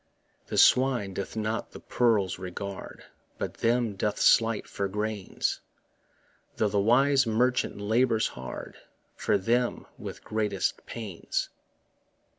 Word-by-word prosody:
The - - -3
swine 125 -7 +4
doth 100 +3 -5
not 110 +1 -2
the - - -8
pearls 105 -7 +1
regard, 95 +1 -7 0.3
But - - -3
them 115 -2 +1
doth 105 +1 -1
slight 115 -1 +4
for 100 - -3
grains, 105 0 -2 1.0
Though 105 - +1
the 100 0 +1
wise 135 +5 +4
merchant 125 0 +1
labours 110 +2 +2
hard 65 0 -8 0.4
For - - +1
them 120 +5 0
with - - -8
greatest 110 -1 -1
pains. 105 -7 -4
110 Hz, 115 wpm, -28 LUFS, 100-120 Hz, 1.0 s, swine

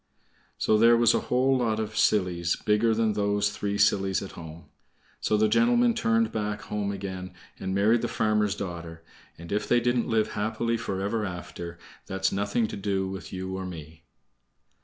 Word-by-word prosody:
So 110 - +2
there 115 +1 +6
was 120 0 +5
a - - +2
whole 130 +2 +3
lot 110 -3 0
of 110 0 -4
sillies 90 -6 +2
bigger 110 +1 +2
than 110 -1 +1
those 105 0 +1
three 100 -1 -3
sillies 95 -1 +2
at 95 - -8
home. 80 0 -10 0.5
So 105 - +1
the 110 +1 +3
gentleman 240 - +3
turned 230 -1 +1
back 105 -1 -3
home 105 -1 -2
again 95 -2 -6 0.2
and 95 0 -3
married 110 +4 +3
the - - -1
farmer's 105 -2 +1
daughter, 85 -4 -7 0.3
and 85 +1 -10
if 105 0 -1
they 120 - +4
didn't 120 0 0
live 110 -1 +2
happy 110 +3 -1
forever 105 0 -2
after, 90 -2 -6 0.3
that's 95 0 0
nothing 100 +4 0
to - - -5
do 95 -1 -1
with 95 0 -7
you 95 0 -4
or 95 - -4
me. 80 -2 -10
105 Hz, 175 wpm, -27 LUFS, 95-110 Hz, 0.5 s, there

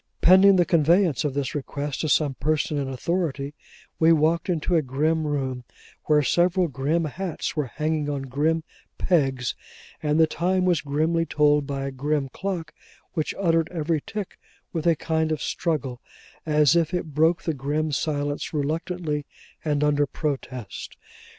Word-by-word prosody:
Pending 190 +2 +7
the 175 -1 +4
conveyance 170 - +3
of 145 -3 -2
this 140 -3 -2
request 145 0 -4
to 155 - -1
some 145 -1 +2
person 150 +2 0
in 140 - -2
authority, 145 0 -2 0.5
we 160 0 +5
walked 160 +2 +2
into 175 +1 0
a 160 - +4
grim 155 +4 0
room, 130 -4 -2 0.4
where 150 -1 +4
several 175 +5 +2
grim 150 +4 0
hats 170 +4 -4
were 150 -4 -1
hanging 150 +2 -2
on 140 -2 -2
grim 150 +5 0 0.3
pegs, 135 -8 +1 0.5
and 150 +1 +1
the 160 - +7
time 180 +3 0
was 175 -3 +2
grimly 160 +4 +1
told 150 -1 +3
by 135 -1 -3
a 135 - -3
grim 140 +1 -1
clock 170 -2 -4 0.4
which 155 -3 -2
uttered 165 -4 +2
every 160 -2 -1
tick 210 -3 -6 0.3
with 165 -1 -1
a 165 - +5
kind 160 +1 -1
of 155 - -1
struggle, 140 -9 -2 0.5
as 150 0 +4
if 170 0 +2
it 165 -4 -4
broke 160 +3 +3
the 160 - -1
grim 150 +3 -1
silence 145 +1 -2
reluctantly, 155 0 -2 0.4
and 150 -2 0
under 145 -1 +2
protest. 130 -5 -5
155 Hz, 155 wpm, -25 LUFS, 145-165 Hz, 0.5 s, Pending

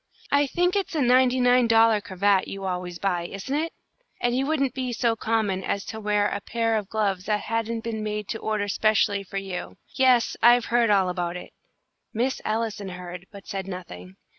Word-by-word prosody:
I 285 0 +3
think 355 +6 +1
it's 390 -4 -1
a 305 - +1
ninety 255 +1 +4
nine 250 -1 +4
dollar 225 -2 +5
cravat 195 0 +1
you 195 0 -6
always 180 -1 -3
buy, 175 -3 -1
isn't 200 +9 -6
it? 320 +3 -1 0.5
And 240 0 +1
you 270 +2 0
wouldn't 275 -5 0
be 255 -2 -3
so 230 0 +1
common 215 -4 -1
as 200 +1 -2
to 220 - -6
wear 210 -1 +1
a 200 0 -3
pair 225 +1 0
of 210 -2 -2
gloves 200 -4 -1
that 210 -1 0
hadn't 230 0 -2
been 225 -1 -4
made 210 -1 -3
to 225 - -3
order 215 -2 -1
specially 205 -1 +2
for 195 +1 -7
you. 195 -2 -5 0.2
Yes, 255 -3 +3
I've 240 0 +6
heard 235 -1 +2
all 195 -3 +4
about 175 -1 -2
it!" - - -11 0.6
Miss 250 +4 0
Allison 215 -2 -2
heard, 180 0 -8
but 200 -1 -12
said 195 -1 -5
nothing. 95 - -8
215 Hz, 195 wpm, -25 LUFS, 195-240 Hz, 0.6 s, I've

